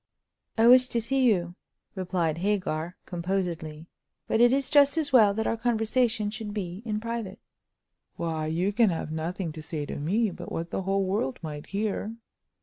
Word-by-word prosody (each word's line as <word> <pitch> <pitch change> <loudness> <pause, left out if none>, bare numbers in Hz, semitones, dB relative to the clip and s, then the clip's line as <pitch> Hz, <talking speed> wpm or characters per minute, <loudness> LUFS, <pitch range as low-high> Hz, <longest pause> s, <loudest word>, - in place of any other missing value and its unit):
"I 225 - +4
wish 255 +1 +7
to 235 - 0
see 260 +3 +1
you," 175 -7 +2 0.4
replied 175 -4 -1
Hagar, 180 -4 -1
composedly, 170 -4 -3 0.4
"but 220 - +1
it 240 0 +6
is 275 +1 +1
just 285 +1 +5
as 295 -4 0
well 215 -5 +7
that 220 - -1
our - - +1
conversation 225 -1 +1
should 215 -1 -6
be 185 -1 -4
in 210 -1 -1
private." 230 -3 -4 0.8
"Why, 160 -2 -2
you 175 +6 0
can 225 0 +4
have 165 -3 -3
nothing 165 +2 -3
to 155 0 -8
say 150 -1 -4
to - - -6
me 200 +9 +1
but 175 0 -9
what 165 +1 -4
the - - -2
whole 195 +1 0
world 185 -9 -1
might 150 -2 -6
hear!" 210 +2 -2
195 Hz, 175 wpm, -27 LUFS, 170-225 Hz, 0.8 s, wish